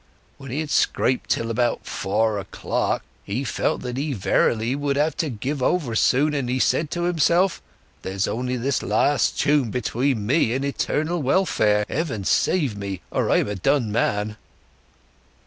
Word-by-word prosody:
When 135 -1 -9
he 140 +6 -2
had 155 -1 -5
scraped 125 0 +1
till 115 0 0
about 120 +1 0
four 105 +2 0
o'clock 95 - -2 0.2
he 115 +7 -3
felt - - -1
that 125 0 -4
he 145 +1 -1
verily 115 +3 +1
would 145 -1 -1
have 150 +2 +1
to 160 -3 -1
give 130 +4 -4
over 135 -3 +1
soon, 140 +6 +3
and 135 -4 -2
he 125 - 0
said 155 +4 +1
to 175 +2 -3
himself, 175 +2 +2 0.4
'There's 95 +1 -2
only 125 +2 -2
this 130 +2 0
last 110 +8 +1
tune 145 -5 +2
between 125 0 -1
me 120 -1 +2
and 135 +2 -1
eternal 155 +4 -1
welfare! 125 - +2
Heaven 135 - -2
save 140 - +1
me, 100 -2 -5
or - - 0
I'm - - +3
a 105 - -2
done 110 +4 +1
man. 105 -1 0
125 Hz, 165 wpm, -23 LUFS, 110-145 Hz, 0.4 s, soon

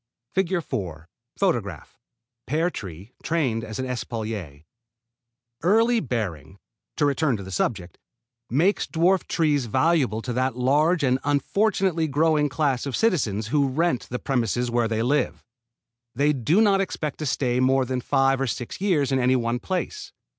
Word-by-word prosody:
[Illustration: 130 - -2 0.3
FIG. - - +2
4 - - -6 0.8
PEAR 160 +6 +1
TREE, 95 - -9
TRAINED 130 -9 0
AS 110 -1 -6
AN 130 - -2
ESPALIER] 110 - -5 1.0
Early 225 +6 +3
bearing 95 - -4 0.4
to 150 - +1
return 140 -3 +1
to 100 - -7
the 95 - -9
subject 90 -1 -2 0.5
makes 170 - +2
dwarf 180 +3 +2
trees 145 -6 +1
valuable 130 -3 +1
to 125 - -3
that 130 0 0
large 150 +6 +2
and 130 -1 +2
unfortunately 170 +3 +1
growing 150 0 +2
class 135 -1 0
of 135 - -2
citizens 115 - 0
who 140 0 +2
rent 140 -1 0
the 125 - -3
premises 125 -2 -1
where 120 -1 +1
they 110 0 -1
live. 140 +2 0 0.7
They 145 +4 +3
do 150 - +2
not 200 -3 +4
expect 155 -6 -4
to 155 - -2
stay 125 -2 0
more 130 +1 +3
than 130 0 -2
five 135 +2 +2
or 135 - 0
six 120 +7 -5
years 160 -9 +1
in 135 - +2
any 130 +1 +3
one 120 -1 0
place. 185 - -4
135 Hz, 155 wpm, -24 LUFS, 120-160 Hz, 1.0 s, not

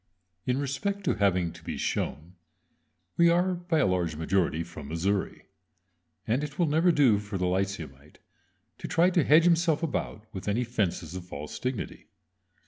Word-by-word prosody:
In 125 0 +1
respect 170 +9 -2
to 175 - +2
"having 95 -5 +1
to - - -14
be - - -4
shown" 80 +6 -3 0.8
we 170 0 +6
are 180 +2 +3
by 175 -1 -1
a - - +4
large 90 -4 0
majority 85 0 0
"from 80 -4 -10
Missouri," 95 +6 -2 0.8
and 120 +6 0
it 150 -1 -6
will 175 - +3
never 160 +4 +3
do 130 -10 +4
for 105 -1 -5
the 90 - 0
lyceumite 85 -7 -3 0.6
to - - -5
try 180 +2 +3
to 175 -3 +3
hedge 155 +4 +6
himself 170 -2 +3
about 125 -8 -3
with 95 - -7
any 110 +5 +1
fences 95 -8 -2
of 90 -1 -6
false 75 -3 -7
dignity. 125 -3 -4
105 Hz, 165 wpm, -28 LUFS, -, 0.8 s, we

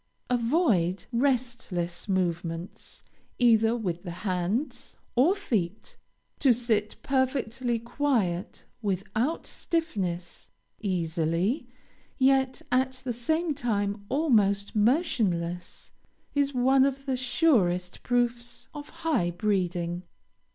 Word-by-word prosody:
Avoid 230 - +2
restless 235 -9 -1
movements 170 -2 -2 0.3
either 225 -2 +4
with 175 -6 -3
the 180 - -7 0.2
hands, 200 - -2 0.2
or 295 +11 +5
feet; 220 - -2 0.4
to 260 -4 +5
sit 220 -3 0
perfectly 260 -3 0
quiet, 230 -7 -1 0.2
without 210 - -1
stiffness, 190 - -3 0.3
easily, 175 - 0 0.5
yet 265 -1 +3
at 260 +1 +2
the 250 -2 -2
same 315 +7 0
time 205 -6 -1
almost 210 -10 +2
motionless, 205 - 0 0.4
is 285 -1 +2
one 265 +1 +4
of 275 0 0
the 265 -2 0
surest 240 - +2
proofs 240 0 0
of 295 -1 -8 0.2
high 240 - +2
breeding. 175 -2 -1
230 Hz, 95 wpm, -28 LUFS, 180-265 Hz, 0.5 s, or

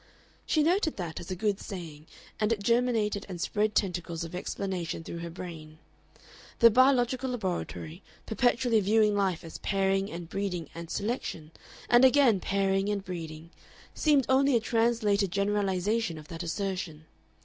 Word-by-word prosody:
She 310 - +3
noted 340 0 +1
that 170 -4 -4
as 170 - -9
a 185 - -2
good 205 +1 0
saying, 165 -6 -8 0.3
and 215 +1 +1
it 210 -3 -1
germinated 230 -3 +1
and 180 -2 -6
spread 210 +4 0
tentacles 175 -3 -1
of 165 - -7
explanation 180 -2 -4
through 170 - -6
her 170 0 -5
brain. 160 -3 -9 0.8
The 230 0 +7
biological 255 +1 +3
laboratory, 185 -6 -4 0.2
perpetually 240 +1 +2
viewing 210 +1 +3
life 190 -4 0
as 165 - -9
pairing 195 0 0
and 170 0 -6
breeding 180 -4 -3
and 170 0 -8
selection, 200 -8 -3 0.4
and 240 +1 +5
again 260 -6 +5
pairing 195 +1 0
and 200 -2 -2
breeding, 165 -2 -7 0.4
seemed 290 -4 +3
only 270 0 +4
a - - +5
translated 220 -4 +1
generalization 200 -1 0
of 155 0 -12
that 165 -1 -6
assertion. 175 -3 -4
195 Hz, 150 wpm, -29 LUFS, 170-230 Hz, 0.8 s, The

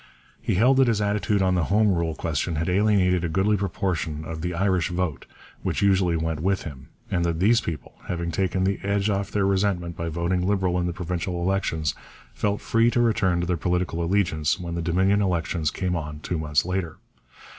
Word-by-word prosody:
He - - 0
held 125 +7 +4
that 135 -1 +5
his 115 -3 +2
attitude 105 -1 +1
on 95 -1 +2
the 90 -2 +1
Home 105 0 +3
Rule 85 -2 -1
question 80 +2 -2
had 80 +2 -1
alienated 90 -2 +3
a 85 - -1
goodly 95 +6 +2
proportion 85 -5 -2
of 80 0 -6
the 90 +1 -3
Irish 95 -1 +1
vote 90 -5 -3 0.3
which - - -1
usually 95 -4 +3
went 80 -1 -2
with 95 +4 0
him, 70 -4 -9 0.2
and 90 -2 +1
that 85 -1 -1
these 110 +5 +4
people, 80 -7 -6
having 85 -1 -2
taken 95 +2 0
the 95 +1 0
edge 100 +1 0
off 100 0 -1
their 100 -2 0
resentment 95 -3 0
by 85 0 -3
voting 85 +3 -1
Liberal 95 -3 +1
in 90 - 0
the - - -1
provincial 90 +1 -3
elections, 85 -5 0 0.4
felt 105 -1 -1
free 115 +1 +3
to 120 - 0
return 105 -7 +2
to - - -1
their 90 0 0
political 90 -1 -1
allegiance 85 -4 +1
when 85 -1 -5
the 85 - -2
Dominion 95 +5 +2
elections 85 -4 0
came 90 -2 -2
on 75 -2 -5
two 85 0 -3
months 75 0 +1
later. 90 -3 -3
90 Hz, 200 wpm, -25 LUFS, 85-100 Hz, 0.4 s, that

